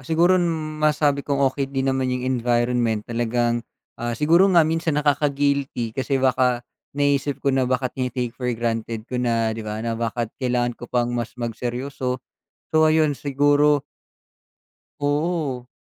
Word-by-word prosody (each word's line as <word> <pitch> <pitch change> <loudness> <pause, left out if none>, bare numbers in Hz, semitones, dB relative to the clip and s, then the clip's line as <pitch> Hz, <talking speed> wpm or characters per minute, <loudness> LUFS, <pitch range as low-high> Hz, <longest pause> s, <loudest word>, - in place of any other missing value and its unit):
siguro 170 +6 +3 0.4
masabi 150 -2 +2
kong 140 0 -1 0.2
okey 135 -1 -2
din 135 -1 0
naman 130 -1 0
yung 125 0 -2
environment 120 -3 +1
talagang, 120 0 0 0.4
ah, 120 0 -2
siguro 170 +6 +4
nga 170 -4 +5
minsan 160 -1 0
nakaka-guilty 140 -4 0
kasi 135 +2 -1
baka 125 -2 +2 0.3
naiisip 145 -1 0
ko 140 - +3
na 130 -1 +1
baka 130 -1 0
tini-take 125 -2 -2
for 125 0 -4
granted 115 -1 -2
ko 125 0 -3
na, 115 -2 +1
di 110 - -5
ba? 105 0 -5
Na 115 - -1
bakit 115 0 -2
kailangan 120 -1 0
ko 120 0 -11
pang 120 -1 0
mas 120 0 -4
magseryoso. 125 +2 -3 0.5
So, - - -4
ayun 155 -2 +3
siguro 145 +1 +2 1.2
Oo. 145 -3 -1
130 Hz, 145 wpm, -23 LUFS, 120-145 Hz, 1.2 s, nga